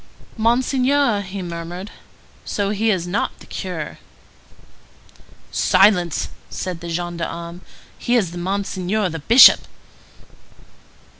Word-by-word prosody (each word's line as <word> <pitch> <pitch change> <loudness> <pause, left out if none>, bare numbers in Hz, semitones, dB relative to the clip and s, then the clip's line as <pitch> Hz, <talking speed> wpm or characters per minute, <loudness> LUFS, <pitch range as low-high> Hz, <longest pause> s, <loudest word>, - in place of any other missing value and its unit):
"Monseigneur!" 250 +1 +2
he 195 0 -6
murmured. 175 +3 -7 0.5
"So 200 -1 -2
he 215 +2 0
is 185 -5 0
not 180 +4 -2
the - - -15
curé?" - - -6 1.5
"Silence!" 185 -4 +3 0.2
said 180 -3 -5
the 170 - -7
gendarme. 170 0 -5 0.4
"He 240 - 0
is 185 -8 0
Monseigneur 190 +2 -2
the 165 -1 -5
Bishop." 230 - +7
190 Hz, 95 wpm, -20 LUFS, 175-215 Hz, 1.5 s, Bishop